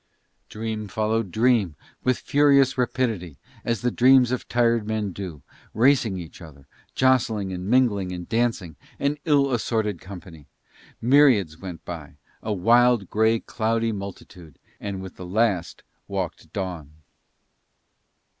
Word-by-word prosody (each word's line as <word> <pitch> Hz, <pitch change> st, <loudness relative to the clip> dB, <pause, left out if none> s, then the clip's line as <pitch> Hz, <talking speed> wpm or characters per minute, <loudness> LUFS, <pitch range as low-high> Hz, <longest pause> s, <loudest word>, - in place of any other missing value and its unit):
Dream 110 Hz, -1 st, -4 dB
followed 110 Hz, +1 st, -1 dB
dream 110 Hz, -6 st, +2 dB, 0.3 s
with 130 Hz, -1 st, +2 dB
furious 140 Hz, -2 st, +3 dB
rapidity, 115 Hz, -, -2 dB, 0.3 s
as 115 Hz, -2 st, -1 dB
the 125 Hz, 0 st, 0 dB
dreams 125 Hz, 0 st, +5 dB
of 130 Hz, -, -3 dB
tired 115 Hz, -2 st, +1 dB
men 110 Hz, -2 st, -2 dB
do, 85 Hz, -8 st, -7 dB, 0.3 s
racing 115 Hz, -4 st, +3 dB
each 85 Hz, 0 st, -10 dB
other, 70 Hz, -5 st, -13 dB, 0.3 s
jostling 115 Hz, -7 st, +2 dB
and 90 Hz, +2 st, -5 dB
mingling 110 Hz, -7 st, +2 dB
and 90 Hz, -1 st, -6 dB
dancing, 110 Hz, -8 st, -1 dB, 0.2 s
an 140 Hz, +1 st, -1 dB
ill 140 Hz, -3 st, +3 dB
assorted 110 Hz, -5 st, -1 dB
company: 85 Hz, -5 st, -11 dB, 0.6 s
myriads 120 Hz, -, +4 dB
went 90 Hz, -3 st, -8 dB
by, 80 Hz, -5 st, -8 dB, 0.3 s
a 110 Hz, -, -4 dB
wild, 115 Hz, +1 st, +3 dB
grey, 110 Hz, +1 st, +3 dB
cloudy 115 Hz, 0 st, -1 dB
multitude; 95 Hz, -6 st, -9 dB, 0.2 s
and 100 Hz, -2 st, -5 dB
with 95 Hz, -, -10 dB
the 95 Hz, -, -8 dB
last 100 Hz, -3 st, 0 dB, 0.2 s
walked 90 Hz, -5 st, -5 dB
dawn. 90 Hz, -7 st, -5 dB
110 Hz, 125 wpm, -24 LUFS, 90-120 Hz, 0.6 s, dreams